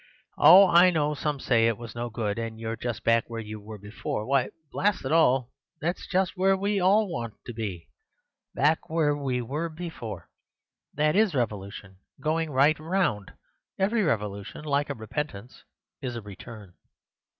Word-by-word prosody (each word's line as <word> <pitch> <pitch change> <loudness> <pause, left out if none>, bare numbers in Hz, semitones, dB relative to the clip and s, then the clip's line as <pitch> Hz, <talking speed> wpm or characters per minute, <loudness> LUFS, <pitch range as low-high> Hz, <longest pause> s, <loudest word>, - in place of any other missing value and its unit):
Oh! 190 +3 +9
I 175 +1 +6
know 150 -3 +1
some 150 -1 -2
say 115 -3 +3
it 115 -2 0
was 115 -1 -9
no 120 0 -4
good, 110 -2 -3
and 115 -1 -5
you're 115 0 -3
just 120 0 -5
back 115 0 +2
where 115 -1 -5
you 110 -1 -7
were 105 +1 -9
before. 105 +1 -5
Why, 135 0 +1 0.2
blast 205 -7 0
it 130 - -2
all, 135 -6 +3 0.3
that's 175 +3 -3
just 185 -1 0
where 190 +1 +3
we 200 +1 0
all 200 +4 +4
want 115 - -5
to 120 - -7
be—back 110 - -4
where 155 -2 +2
we 130 -4 -2
were 150 +8 -3
before! 155 - -7 0.7
That 150 +1 +2
is 205 -6 +3
revolution—going 105 - -3
right 145 +3 +3
round! 160 - -1 0.4
Every 215 +4 +1
revolution, 105 - -2
like 145 0 0
a 140 - -3
repentance, 115 0 -6 0.4
is 125 -2 -4
a 115 - -5
return. 105 -1 -11
130 Hz, 160 wpm, -27 LUFS, 110-165 Hz, 0.7 s, Oh